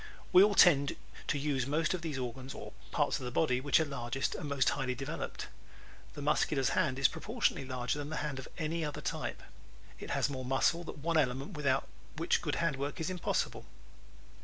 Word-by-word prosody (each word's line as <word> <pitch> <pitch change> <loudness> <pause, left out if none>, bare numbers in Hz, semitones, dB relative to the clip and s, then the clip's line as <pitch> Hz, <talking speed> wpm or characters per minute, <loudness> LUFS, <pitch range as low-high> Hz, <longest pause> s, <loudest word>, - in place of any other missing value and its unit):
We 180 - +10
all 205 0 +5
tend 140 -7 +6 0.3
to 145 - +1
use 140 -3 0
most 155 +3 +1
those 165 -6 -2
organs 130 +1 -5
or - - -8 0.2
parts - - +1
of 130 - -6
the - - -2
body 125 -1 +1
which 145 +3 +4
are 160 - +2
largest 135 -2 -2
and 150 - -5
most 140 -3 +3
highly 130 -2 -1
developed. 135 +1 -4 0.7
The 145 - -6
Muscular's 145 -2 +2
hand 130 - +1
is 135 - +5
proportionately 210 - -1
larger 125 +2 -1
than 145 0 -4
the 160 - -3
hand 140 -3 -3
of 130 - -8
any 165 +1 -1
other 150 -2 -4
type. - - -3 0.6
It - - -7
has - - +1
more 130 -3 -4
muscle, 135 +6 +2
that - - -7
one 165 +3 0
element 135 +4 +1
without 150 -6 0 0.3
which - - +2
good - - -1
hand 165 -5 0
work 140 +4 -3
is 160 +3 -1
impossible. 180 -2 -1
140 Hz, 195 wpm, -32 LUFS, 130-160 Hz, 0.7 s, We